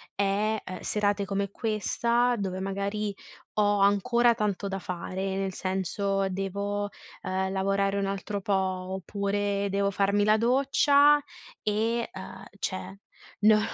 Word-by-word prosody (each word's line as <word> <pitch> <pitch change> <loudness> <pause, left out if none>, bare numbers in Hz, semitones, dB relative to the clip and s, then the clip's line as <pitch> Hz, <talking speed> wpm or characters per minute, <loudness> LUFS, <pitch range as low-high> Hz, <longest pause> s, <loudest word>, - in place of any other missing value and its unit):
è, 205 +2 +1
ehm, 185 0 -6
serate 205 -1 0
come 200 0 -2
questa, 235 +3 +1
dove 190 -2 -3
magari 200 +2 -2 0.4
ho 205 -1 +3
ancora 235 +4 +4
tanto 205 -3 -1
da 195 0 -3
fare, 185 +2 -4
nel 195 -1 -2
senso 195 +1 -1
devo, 200 +2 -2 0.3
ehm, 190 0 -1
lavorare 195 +1 +1
un 200 - 0
altro 200 +1 -3
po', 200 +1 -1
oppure 200 +2 -1
devo 200 0 +1
farmi 200 +1 +2
la 215 +1 +4
doccia 280 +4 +4 0.4
e, 225 +3 0
ehm, 190 +1 -9
cioè 190 +1 -4 0.4
no 215 0 +6
200 Hz, 125 wpm, -28 LUFS, 195-210 Hz, 0.4 s, no